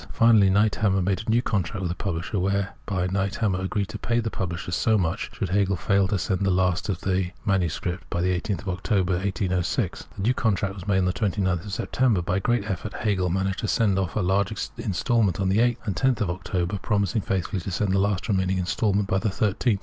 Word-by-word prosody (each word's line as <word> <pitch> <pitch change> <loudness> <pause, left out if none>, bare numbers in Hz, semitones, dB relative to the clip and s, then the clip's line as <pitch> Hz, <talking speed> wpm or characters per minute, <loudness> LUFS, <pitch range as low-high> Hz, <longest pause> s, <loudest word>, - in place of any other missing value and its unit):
Finally, 110 -4 +5
Niethammer 100 -1 +2
made 95 +2 0
a 110 - -7
new 120 +2 +3
contract 100 -2 -1
with 90 -2 -2
the 85 - -5
pubhsher, 90 +1 -2
whereby 100 -1 -1
Niethammer 95 0 0
agreed 100 +1 -1
to 110 -1 -6
pay 120 0 0
the 115 -1 -2
pubhsher 90 -1 -4
so 110 +5 +3
much 90 +3 -1
should 95 - -2
Hegel 100 +1 +2
fail 100 +2 +2
to 100 - -1
senc 95 -1 -1
the 95 - +2
last 90 +1 +1
of 95 - -1
the 95 -1 0 0.2
MS. 90 -6 +1 0.3
by 85 - -2
the 90 +1 +1
18th 95 0 -3
October, 95 0 0
1806. 95 -2 -1
This 100 - -1
new^ 125 - +3
contract 100 -4 0
was 95 0 -9
made 95 -2 +2
on 90 - +2
29th 95 -2 -1
September. 105 -1 +1
By 90 +2 0
great 120 +2 +1
effort,! 100 +1 -4
■ - - -7
Hegel 95 -4 +1
managed 95 +2 -1
to 110 - -2
send 100 -3 +2
off 95 -2 -2
large 95 0 +1 0.3
instalments 100 -2 +1
on 95 -1 +1
the 100 +3 +2
8th' 120 0 +3
and 100 -3 -2
on 130 -1 +4
10th 110 - -8
of 95 -5 +1
October, 95 +1 -2
promising 105 +1 0
faithfully 95 0 -2
to 90 - -5
send 95 +2 0
the 95 - +3
last 100 -1 0
remaining 95 -2 +1
instalment 100 +2 0
by 95 - +1
the 110 - 0
13th. 105 +2 +1
95 Hz, 215 wpm, -25 LUFS, 95-105 Hz, 0.3 s, Finally